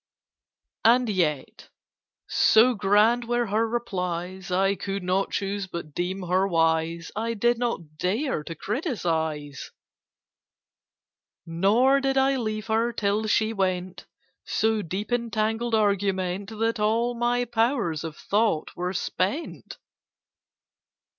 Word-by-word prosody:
"And 240 +1 +4
yet, 160 -8 -2 0.6
so 235 +3 +5
grand 215 +4 +3
were 240 0 0
her 220 +2 0
replies, 185 -5 -3
I 195 +2 +2
could 195 0 -4
not 185 +2 0
choose 200 0 -3
but 170 -4 -7
deem 185 +3 -3
her 185 +2 +1
wise; 165 -1 0
I 230 +2 -2
did 240 +2 +1
not 170 -11 -3
dare 210 - -1
to 165 - -6
criticise; 160 - -3 1.8
"Nor 210 +11 +3
did 270 0 0
I 270 +1 +3
leave 215 -3 -3
her, 225 +1 +1
till 210 0 0
she 220 +1 +2
went 185 -2 -2 0.4
So 220 0 0
deep 195 +6 -5
in 235 -1 0
tangled 225 +1 0
argument 195 -2 0
That 225 +1 0
all 230 +3 +1
my 240 +1 0
powers 230 - 0
of 160 -2 -6
thought 205 -6 0
were 180 +1 -3
spent." 195 - -3
205 Hz, 120 wpm, -25 LUFS, 180-230 Hz, 1.8 s, so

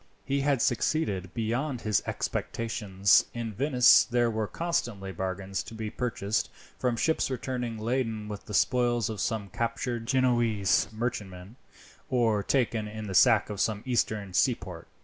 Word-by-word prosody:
He 140 0 0
had 140 -3 +2
succeeded 105 - 0
beyond 120 +4 -2
his 105 -2 +1
expectations. 100 -4 +1
In 115 -2 -4
Venice 125 +1 +5
there 120 -1 +1
were 110 -1 -2
constantly 120 - -2
bargains 95 +1 -3
to 115 - -10
be 110 -1 -5
purchased 110 -4 -2 0.3
from 125 -2 0
ships 160 +4 +1
returning 125 -3 -3
laden 110 -2 -2
with 105 -1 -7
the 105 - -5
spoils 120 -1 +2
of 105 -3 -4
some 110 -4 -2
captured 115 +2 -3
Genoese 120 -7 +2
merchantman, 105 -3 -5 0.5
or 115 -5 +2
taken 115 -1 0
in 110 0 -7
the 100 - -5
sack 110 +1 +5
of 100 - -3
some 105 -1 0
Eastern 110 -6 -1
seaport. 90 -5 0
115 Hz, 145 wpm, -28 LUFS, 100-125 Hz, 0.5 s, Venice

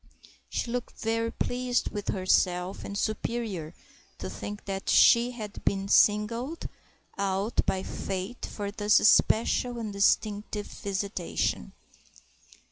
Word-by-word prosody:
She 235 - -2
looked 245 0 -4
very 230 +1 -1
pleased 250 0 -1
with 205 -1 -5
herself 185 -1 +1
and 200 - -5
superior, 210 -6 -3 0.4
to - - -6
think 205 0 -7
that 195 -1 -4
she 235 0 +6
had 215 -4 -8
been 195 0 0
singled 230 +11 +2 0.5
out 195 +3 0
by 190 0 0
Fate 190 +6 -5
for 200 -1 -5
this 210 0 +2
special 240 +3 +3
and 220 -3 -4
distinctive 205 +1 +1
visitation. 195 - -3
210 Hz, 115 wpm, -28 LUFS, 195-230 Hz, 0.5 s, she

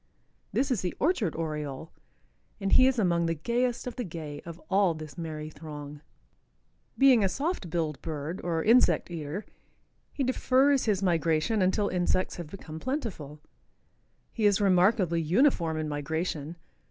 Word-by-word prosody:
This 275 +1 0
is 235 - +1
the 180 - -3
Orchard 270 - +1
Oriole, 150 -2 -4 0.7
and 195 -1 -2
he 260 - +7
is 265 -1 +1
among 170 -5 +2
the 165 - 0
gayest 235 +9 -1
of 250 - -6
the 250 - -2
gay 155 -6 -7
of 170 0 -8
all 190 -3 +3
this 155 -3 -9
merry 155 -2 -6
throng. 150 -2 -9 1.0
Being 265 -5 +6
a 195 - +2
soft 285 - -2
billed 160 -4 -2
bird, 160 +2 -5
or 165 -2 -1
insect 230 -4 +4
eater, 165 +4 -5 0.7
he 280 - -2
defers 265 +1 +3
his 200 -4 +1
migration 170 +4 +1
until 190 +2 +2
insects 185 0 0
have 170 -3 -6
become 160 -4 -8
plentiful. 185 - -4 0.9
He 220 -3 +2
is 205 -1 +3
remarkably 185 -3 +3
uniform 170 - +2
in 155 0 -2
migration. 150 +2 -3
175 Hz, 150 wpm, -28 LUFS, 155-220 Hz, 1.0 s, he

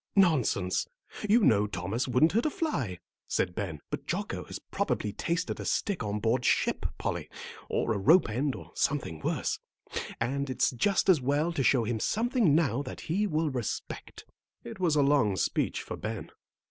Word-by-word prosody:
"Nonsense; 135 - +3 0.4
you 230 +3 +6
know 105 - +4
Thomas 100 +6 -2
wouldn't 130 +6 +4
hurt 230 +8 +2
a - - +2
fly," 130 - -2 0.3
said 90 - 0
Ben. 85 -7 -4
"But - - -4
Jocko - - -3
has - - -6
probably 105 -1 -2
tasted 170 +1 -2
a - - -5
stick 200 -8 0
on 105 -1 -2
board 115 +3 +1
ship, - - +2
Polly, - - -3 0.4
or 115 - +1
a 100 - -2
rope 160 - +6
end, 130 +5 -1
or - - -10
something 135 - -1
worse. - - -1 0.6
And 135 +4 -1
it's 130 - +2
just 185 - +1
as 180 -7 +5
well 145 +6 +1
to 145 - 0
show 130 -2 +4
him 110 0 -1
something 225 - +2
now 140 -5 +2
that 130 - -7
he 200 +6 0
will 155 -3 0
respect." 125 -5 -5 0.4
It 120 - -8
was 170 -4 +2
a 145 - +4
long 135 -8 +3
speech - - 0
for - - -6
Ben. 110 -1 -5
135 Hz, 175 wpm, -29 LUFS, 110-170 Hz, 0.6 s, you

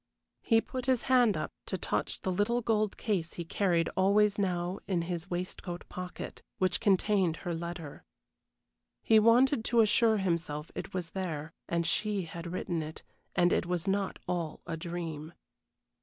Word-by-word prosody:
He 225 -1 +4
put 255 +1 -5
his 255 -3 +2
hand 245 -5 +4
up - - -3 0.2
to - - -2
touch - - -2
the 190 - -1
little 205 +6 +1
gold 215 -2 +1
case 185 -7 -1
he 170 - -5
carried 170 -1 +1
always 205 +2 +3
now 180 -1 -1
in 180 -4 +1
his 175 +1 -4
waistcoat 175 0 -4
pocket, 180 0 -7 0.2
which 185 -2 +1
contained 195 -4 +2
her 175 - -1
letter. 170 -2 -6 1.0
He 220 -1 +6
wanted 235 +3 +5
to 235 - +3
assure 220 0 +4
himself 170 -5 -2
it - - -6
was 175 -3 -3
there, 165 -5 -4 0.2
and 170 0 +1
she 200 +4 0
had 170 +1 -7
written 175 -2 -2
it 155 0 -7 0.3
and 175 0 +4
it - - +1
was 180 +1 -1
not 195 0 0
all 170 -4 -2
a 170 - -3
dream. 165 -2 -5
180 Hz, 160 wpm, -31 LUFS, 170-210 Hz, 1.0 s, He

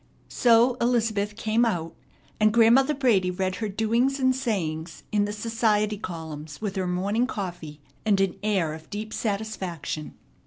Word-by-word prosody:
So 240 +1 +4
Elizabeth 220 -4 +1
"came 225 +1 +1
out," 170 -8 -1 0.5
and 215 0 +4
Grandmother 235 +6 +5
Brady 225 -9 +2
read 185 0 -2
her 215 -2 -3
doings 230 +7 +1
and 260 -1 +3
sayings 165 -10 -3
in 205 -1 +2
the 205 - -3
society 215 -1 0
columns 160 -5 -7
with 210 -2 -3
her 190 -1 -1
morning 200 +7 0
coffee 175 - -6 0.2
and 205 -3 +2
an 195 -2 +1
air 195 -7 0
of 160 0 -11
deep 215 +1 -5
satisfaction. 195 -8 -4
210 Hz, 150 wpm, -26 LUFS, 180-230 Hz, 0.5 s, Grandmother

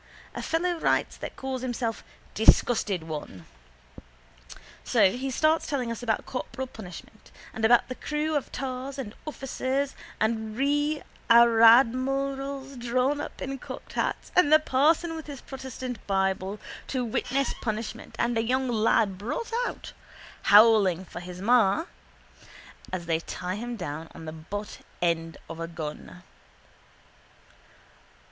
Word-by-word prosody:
A - - -5
fellow 345 +1 0
writes - - +1
that - - -7
calls 265 -1 -4
himself 245 -3 -2 0.3
Disgusted 215 -4 +4
One. 150 - -7 1.4
So 190 - +4
he 260 +5 -3
starts 310 +5 +2
telling 255 -6 -1
us 230 - -5
about 225 -3 -1
corporal 265 0 -4
punishment 215 -2 -11 0.2
and 220 - -5
about 235 +2 +5
the 255 - -4
crew 300 +4 -2
of 290 - -2
tars 265 +1 -4
and 230 -6 -5
officers 270 -1 -2 0.3
and 220 0 -1
rearadmirals 270 -1 +3
drawn 255 +4 +1
up - - -7
in 270 0 -4
cocked - - -9
hats - - -2
and 305 -5 +5
the 310 - +10
parson 310 +3 +2
with 320 -1 -7
his 285 -3 -7
protestant 260 -3 -7
bible 195 +1 0 0.3
to 255 -2 -1
witness 265 +4 0
punishment 225 +1 -4
and 240 0 +1
a 225 - +2
young 260 +2 0
lad 215 -4 +2
brought 255 - -4 0.2
out, - - -7 0.6
howling 205 -4 +6
for 175 - -8
his 180 0 -8
ma, 240 - +4 1.1
and 185 -2 -3
they 165 -1 0
tie 180 +2 -5
him 240 +4 -4
down 160 -5 -5
on 160 - -9
the 155 - -6
buttend 165 -2 -4
of 165 - -8
a 165 - -3
gun. 165 +1 -7
240 Hz, 130 wpm, -27 LUFS, 200-270 Hz, 1.4 s, the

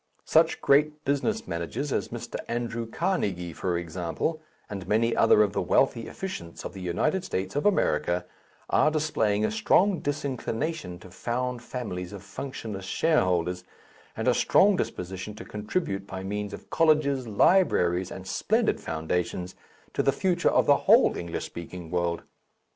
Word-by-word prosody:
Such - - +3
great 150 +2 +3
business 145 +11 0
managers 85 - -3
as - - 0
Mr. - - -6
Andrew 115 -1 -3
Carnegie, 95 - -1
for 90 0 -1
example, 85 - -3 0.3
and 95 -3 -6
many 115 +3 +2
other 105 - +6
of 100 -1 -1
the - - 0
wealthy 115 - +2
efficients 85 - -6
of - - -5
the 95 - -8
United 150 - 0
States 95 - -3
of 145 - +2
America, 90 - +1 0.5
are 155 - +4
displaying 115 -10 +1
a - - 0
strong 205 -4 +3
disinclination 140 - -3
to 90 - -13
found 125 +5 -2
families 105 -7 -5
of 100 -2 -8
functionless 105 -2 -6
shareholders, 90 - +1 0.5
and - - -2
a - - +5
strong 200 +1 +4
disposition 95 - -4
to 110 - -9
contribute, 105 - -3
by 95 -1 -6
means 105 +1 -3
of - - -10
colleges, 150 -5 +3
libraries, 95 - +3
and 95 - -8
splendid 220 - +1
foundations, 90 +3 -2 0.4
to - - +1
the 135 - +3
future 180 +4 +1
of - - +3
the - - +5
whole - - +6
English 85 -1 -4
speaking 85 0 -8
world. 85 -1 -1
105 Hz, 150 wpm, -27 LUFS, 90-150 Hz, 0.5 s, other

